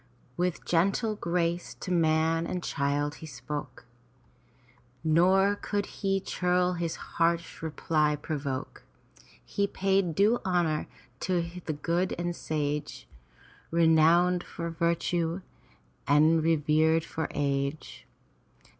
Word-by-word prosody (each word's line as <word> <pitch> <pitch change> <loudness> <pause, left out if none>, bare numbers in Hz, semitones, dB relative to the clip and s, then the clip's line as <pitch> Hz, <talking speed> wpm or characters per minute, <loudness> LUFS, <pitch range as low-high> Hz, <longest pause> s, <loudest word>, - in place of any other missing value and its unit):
With 180 +1 -2
gentle 195 +6 +1
grace 170 -2 -1
to 185 - -6
man 165 -1 +2
and 180 -1 -3
child 145 0 -1
he 160 - -7
spoke. 140 +2 -7 1.2
Nor 185 +5 +4
could 205 0 -2
the 195 -1 +1
churl 180 -1 0
his 170 -2 -2
harsh 170 0 -1
reply 155 -1 0
provoke. 140 -3 -4 0.6
He 200 0 0
paid 190 -4 0
due 215 +5 +3
honor 175 -4 0 0.3
to 175 -2 0 0.2
the 155 - 0
good 170 +5 -1
and 175 0 -2
sage, 150 -2 -3 0.6
Renowned 170 +2 +4
for 170 0 -6
virtue 170 +1 0 0.7
and 155 +3 +5
revered 160 0 +2
for 160 - -3
age. 140 +1 -2
165 Hz, 105 wpm, -28 LUFS, 155-180 Hz, 1.2 s, and